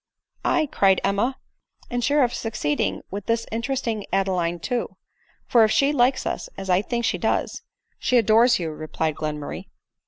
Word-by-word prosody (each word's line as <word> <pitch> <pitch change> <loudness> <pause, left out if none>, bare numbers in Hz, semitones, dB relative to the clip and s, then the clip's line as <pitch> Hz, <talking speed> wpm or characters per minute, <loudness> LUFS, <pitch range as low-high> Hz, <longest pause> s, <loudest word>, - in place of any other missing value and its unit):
" - - -63
Aye," 310 - +2
cried 195 -1 +4
Emma, 225 +7 0 0.3
" - - -30
and 245 0 -1
sure 285 +3 +3
of 245 - 0
succeeding 215 -10 -2
with 200 0 -6
this 230 0 0
interesting 230 -2 -2
Adeline 185 -3 0
too; 240 +8 -3 0.5
for 235 -2 +5
if 215 - +4
she 275 +6 +3
likes 255 -1 +2
us, - - -3
as 195 -1 -3
I 180 +1 +4
think 235 +2 -2
she - - 0
does—" - - -1 0.2
" - - -57
She 255 - +2
adores 230 +2 +5
you," 165 -3 -3
replied 155 +1 -3
Glenmurray. 150 -1 -5
220 Hz, 180 wpm, -24 LUFS, 185-245 Hz, 0.5 s, for